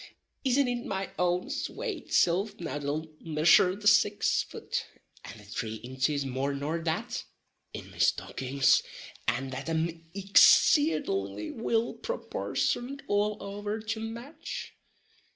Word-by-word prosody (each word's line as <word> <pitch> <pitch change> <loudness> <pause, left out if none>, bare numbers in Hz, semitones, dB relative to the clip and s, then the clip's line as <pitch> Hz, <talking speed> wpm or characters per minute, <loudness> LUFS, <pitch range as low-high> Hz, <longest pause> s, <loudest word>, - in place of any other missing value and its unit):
Isn't 270 0 +3
it 245 -1 -2
my 195 0 -3
own 180 +9 +1
swate 410 +3 -4
silf 195 +5 +2
now 145 -4 -4
that'll 145 +2 -3
missure 165 +3 +4
the 210 +1 -3
six 205 0 +4
fut, - - -5 0.4
and 110 - -10
the - - -14
three 110 +2 -4
inches 130 +5 -1
more 135 +2 -2
nor 150 +4 -2
that, 160 -1 -2 0.5
in - - -9
me - - -14
stockins, 135 +1 +2 0.5
and 135 0 0
that 135 +4 -5
am 165 +1 -1
excadingly 190 - +4
will 230 0 0
proportioned 275 - -2
all 205 +1 +1
over 205 +2 -4
to 220 +1 -4
match? 235 +7 -7
180 Hz, 125 wpm, -29 LUFS, 140-220 Hz, 0.5 s, missure